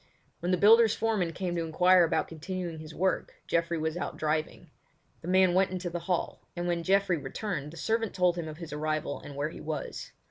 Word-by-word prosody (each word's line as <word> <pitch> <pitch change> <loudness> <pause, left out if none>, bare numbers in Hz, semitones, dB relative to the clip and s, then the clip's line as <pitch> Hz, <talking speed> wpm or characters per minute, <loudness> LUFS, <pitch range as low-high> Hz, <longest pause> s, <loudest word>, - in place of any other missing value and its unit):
When 175 - -3
the 180 - +3
builder's 220 +3 +6
foreman 215 -7 0
came 175 +1 -3
to 170 - 0
inquire 180 +3 +5
about 165 - +1
continuing 165 +1 -5
his 155 0 -9
work 185 +1 0
Geoffrey 170 0 0
was 160 0 -1
out - - -4
driving; 155 +1 -2 0.5
the 165 - -9
man 185 0 +4
went 190 +1 +3
into 180 -1 -4
the 175 - -3
hall, 180 - -1
and 175 0 -2
when 170 -1 0
Geoffrey 190 0 +2
returned 150 -2 -4
the 165 - -11
servant 225 +3 -1
told 180 -2 +3
him 170 -2 -4
of 155 -1 -7
his 165 -3 -8
arrival 155 -1 -2
and 145 - -9
where 145 +2 -1
he - - -10
was. 155 0 -5
175 Hz, 210 wpm, -29 LUFS, 160-185 Hz, 0.5 s, builder's